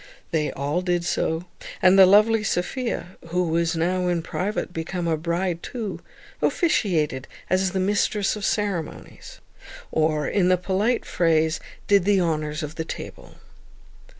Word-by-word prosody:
They 155 -2 0
all 145 +5 -1
did 175 -1 0
so; 160 0 -1 0.3
and 185 0 +5
the 190 -1 +8
lovely 210 +3 +5
Sophia, 195 -1 -2
who 180 +2 0
was 165 +1 +1
now 180 +2 0
in 175 -2 0
private 190 +1 -3
become 170 +1 -3
a 165 - +2
bride 170 +2 -2
too, 225 -5 -5 0.4
officiated 160 - +1 0.2
as 185 0 +2
the 190 +1 -2
mistress 205 +1 +1
of 210 - -7
the - - 0
ceremonies, 200 -7 -4 0.5
or, 155 -2 +1
in 190 -3 +2
the 185 - +4
polite 200 +6 0
phrase, 160 -2 +1 0.3
did 200 -3 +4
the 200 -1 +4
honours 155 -2 -1
of 150 +1 -6
the 160 - -1
table. - - -8
180 Hz, 150 wpm, -24 LUFS, 160-195 Hz, 0.5 s, the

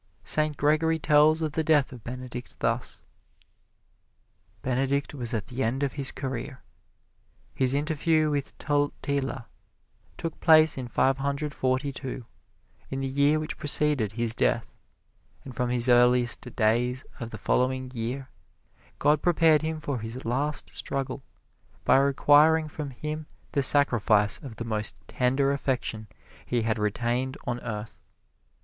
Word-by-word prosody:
Saint 155 -1 +1
Gregory 155 +2 +2
tells 155 +1 +4
of 155 - -1
the 160 +2 -1
death 150 -4 +3
of 120 -3 -11
Benedict 125 0 -7
thus: 115 +2 -2 1.6
Benedict 135 +3 0
was 125 -5 -4
at 110 -3 -2
the 130 0 -5
end 130 +5 -1
of 140 - -1
his 140 -3 +1
career. 130 -1 -5 1.0
His 130 0 +1
interview 155 +1 +1
with 140 -2 -3
Totila 140 -3 -1 0.7
took 165 -1 -5
place 155 -2 +6
in 130 -2 -5
Five 135 +2 +1
Hundred 140 +2 -2
Forty 130 +1 0
two, 130 -1 -6 0.7
in 135 0 -3
the 135 - -1
year 140 +3 +2
which 155 - -5
preceded 145 -7 +1
his 115 0 -1
death; - - 0 0.7
and 130 - -8
from 125 0 -1
his 120 0 +1
earliest 125 0 +4
days 120 +3 +1
of 115 - -5
the - - -7
following 130 0 0
year, 125 +3 -3 0.7
God 150 +1 +2
prepared 165 -3 +4
him 160 0 -3
for 140 -4 -3
his 115 +4 -7
last 140 +6 -2
struggle, 135 -1 -4 0.6
by - - +5
requiring 145 +3 +4
from 150 -1 -6
him 150 +3 -6 0.2
the 140 - +1
sacrifice 115 -7 +3
of 130 -6 -9
the 115 - -6
most 110 -2 -2
tender 135 +2 +1
affection 125 -6 -2 0.4
he 120 -2 -1
had 110 0 0
retained 120 +5 -1
on 120 0 -2
earth. 105 -3 -6
135 Hz, 140 wpm, -27 LUFS, 120-150 Hz, 1.6 s, place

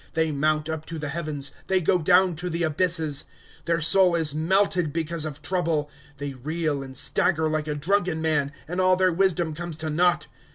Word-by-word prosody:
^^ - - -35
They 160 -1 +1
mount 155 +1 0
up 160 -1 -5
to 165 - -6
the 150 -2 -4
heavens, 150 -3 -3 0.2
they 190 -1 +3
go 180 +1 +2
down 180 +1 +4
to 180 +2 -3
the 170 0 -2
abysses; 160 -2 +1 0.4
Their 170 0 +1
soul 180 +2 +5
is 160 -3 +1
melted 180 0 +1
because 165 0 -2
of 150 -1 -7
trouble, 165 -5 -1
'" 145 0 -26
They 140 0 -5
reel 150 +2 -2
and 130 -1 -8
stagger 160 +2 +1
like 155 -1 -2
a 150 - -2
drunken 175 +2 0
man. 150 -3 0 0.2
And 180 +3 -2
all 185 0 +4
their 185 -1 +2
wisdom 175 -3 +2
comes 170 0 -6
to 160 -1 -4
naught. 175 +3 +2
160 Hz, 205 wpm, -25 LUFS, 150-175 Hz, 0.4 s, soul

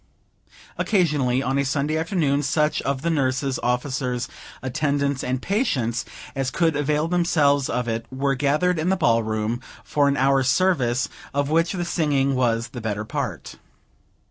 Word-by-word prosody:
Occasionally, 145 - +2
on 135 +1 0
a - - +2
Sunday 140 +3 0
afternoon, 160 -4 +1
such 150 +2 +1
of 140 0 -2
the 170 - +1
nurses, 135 -2 0
officers, 125 0 -1 0.4
attendants, 140 0 0
and 130 0 -1
patients 130 - 0 0.3
as 135 -2 -1
could 165 0 +1
avail 150 +2 +1
themselves 155 -5 +2
of 125 0 -1
it, 115 0 -3
were 135 +1 0
gathered 150 +6 +1
in 160 +3 0
the 190 - +2
Ball 115 -9 +3
Room, 110 +2 -2 0.2
for 145 -1 +2
an 140 0 +1
hour's 135 0 +3
service, 135 -6 +2 0.3
of 145 +1 0
which 165 +3 +2
the 175 -2 -2
singing 145 -5 +1
was 115 -2 +1
the 125 -2 -7
better 105 -1 -3
part. - - -4
140 Hz, 155 wpm, -23 LUFS, 125-155 Hz, 0.4 s, Ball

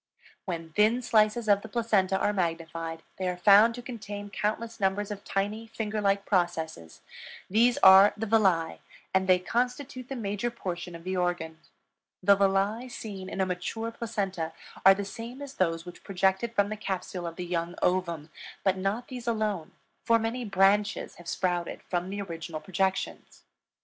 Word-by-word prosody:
When 165 -3 -5
thin 220 +6 +3
slices 215 +1 +3
of 200 -1 +4
the 220 - -8
placenta 205 -5 +2
are 205 - +1
magnified 165 -2 -3 0.2
they 185 - -1
are 180 - -3
found 205 +5 +6
to 245 - -8
contain 205 -4 -7
countless 220 +4 -2
numbers 195 +1 0
of 205 -1 -6
tiny, 210 +3 -2
finger 220 -1 -3
like 200 0 +1
processes; 165 - -1 0.5
these 235 +4 +4
are 190 +2 +9
the 225 - -2
villi, 195 -7 +2 0.3
and 190 0 +2
they 185 -1 +6
constitute 250 +6 -2
the 270 - -3
major 210 0 -2
portion 180 -6 -5
of 165 - -10
the 185 +1 -2
organ. 175 -3 -1 0.6
The 200 +2 +7
villi 200 +5 +1
seen 195 -6 -7
in 195 - -3
a - - +3
mature 185 +5 -3
placenta 195 -8 -3 0.3
are 195 0 +8
the 200 0 -4
same 230 +5 -8
as 285 -1 -7
those 165 -5 0
which 175 - -11
projected 195 +4 0
from 205 -1 +3
the 215 - -4
capsule 185 -3 -4
of 165 - -6
the 180 - -5
young 170 0 -2
ovum, 170 -4 0 0.3
but 190 -1 +2
not 205 +6 -1
these 245 -2 -8
alone, 215 -7 -1 0.3
for 230 - +4
many 230 +2 -2
branches 200 +1 +2
have 175 - -13
sprouted 175 -1 -2
from 180 0 -2
the 200 +1 -3
original 165 -3 -6
projections. 190 +2 -2
195 Hz, 170 wpm, -28 LUFS, 180-220 Hz, 0.6 s, are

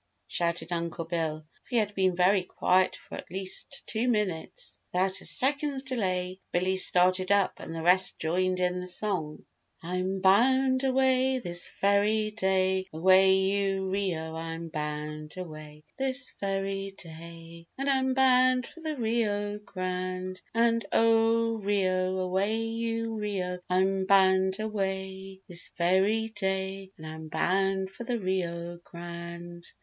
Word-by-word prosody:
shouted 170 - -2
Uncle 170 -1 -3
Bill, 160 -2 -2
for - - -34
he 245 - 0
had 210 -2 +1
been 190 -2 +1
very 185 +2 +4
quiet 185 +1 +2
for - - -14
at - - -7
least 190 - -2
two 230 +3 -1
minutes. 210 - -2
Without 190 +1 0
a - - -8
second's 280 0 +1
delay, 185 -8 -2
Billy 185 +2 +1
started 185 0 +4
up 200 -1 +2
and 165 - -7
the 165 - -4
rest 180 +2 +4
joined 185 +3 0
in 180 0 0
the 180 - -6
song. 180 -5 -2 0.4
RIO 170 - -6
GRANDE - - 0
"I'm 190 0 -2
bound 260 +7 +4
away 260 0 +3
This 175 -7 -4
very 210 +2 +2
day 190 -2 +1
Away 190 +4 +5
you 195 0 0
Rio 175 -5 -2
I'm 165 0 -5
bound 150 +1 -5
away 155 -4 -9 0.2
This 265 0 0
very 195 0 -2
day 165 0 -11
And 275 +1 -3
I'm 265 -1 +2
bound 255 -1 +4
for - - -13
the 315 -1 -3
Rio 210 -3 -1
Grande. 185 -1 -4
And 230 0 +3
oh, 225 0 +3
Rio, 190 -2 0
away 190 +4 0
you 225 0 -2
Rio, 185 -4 -3
I'm 190 +1 +1
bound 190 0 +4
away 190 -2 -4
This 175 -3 0
very 195 +6 +2
day, 190 -2 -3
and 160 - -10
I'm 160 0 -7
bound 190 +4 0
for 215 - -8
the 240 0 -1
Rio 175 -3 -3
Grande." 170 0 -8
190 Hz, 145 wpm, -28 LUFS, 180-215 Hz, 0.4 s, Away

